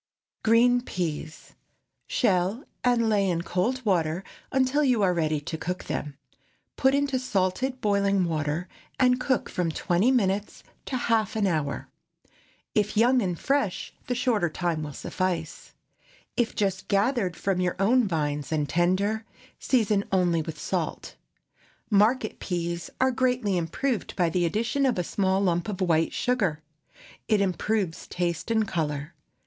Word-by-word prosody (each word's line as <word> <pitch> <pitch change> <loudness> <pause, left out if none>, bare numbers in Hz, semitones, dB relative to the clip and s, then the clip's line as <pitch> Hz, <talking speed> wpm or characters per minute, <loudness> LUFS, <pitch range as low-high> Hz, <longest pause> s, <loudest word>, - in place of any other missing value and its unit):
GREEN 245 +2 +5
PEAS. 160 -7 -5 0.5
Shell 195 +2 +1 0.2
and 240 -2 +3
lay 200 -3 +2
in 170 -1 -1
cold 240 +10 -1
water 175 -3 +1 0.3
until 265 +3 +2
you 250 -6 +3
are 185 -2 +3
ready 155 -3 0
to 160 +1 -5
cook 180 +3 -3
them. 145 -2 -4 0.6
Put 265 +1 +3
into 280 -2 +1
salted 255 +3 -1
boiling 200 -2 +2
water, 155 +1 -2 0.3
and 250 -1 +4
cook 260 0 0
from 175 -2 -1
twenty 180 +8 +1
minutes 205 -5 0 0.2
to 260 - -1
half 225 -3 +1
an 215 -2 +1
hour. 155 -6 -1 0.9
If 210 0 0
young 245 +3 +5
and 180 -4 -1
fresh, 275 - -1
the 245 - 0
shorter 230 -8 +1
time 165 -1 -2
will 150 -2 -5
suffice. 170 +1 -3 0.6
If 240 -3 0
just 195 -2 -1
gathered 200 -2 +1
from 190 0 -1
your 180 -1 0
own 225 +5 +3
vines 150 -4 -2
and 150 -2 0
tender, 185 +7 +1 0.4
season 215 -6 +2
only 175 -3 +2
with 155 0 -6
salt. - - -3 0.8
Market 215 +3 +3
peas 170 -2 -3
are 260 0 +3
greatly 250 -5 +1
improved 195 - -2
by 175 -3 +1
the 175 0 +2
addition 235 +9 0
of 250 - 0
a 180 - +1
small 190 +2 +1
lump 175 -1 +1
of 200 - -4
white 165 -3 +2
sugar. 195 -12 0 0.6
It 215 -2 +3
improves 195 -1 -1
taste 175 +2 -2
and 220 -2 +2
color. 150 -2 -2
195 Hz, 145 wpm, -26 LUFS, 170-235 Hz, 0.9 s, GREEN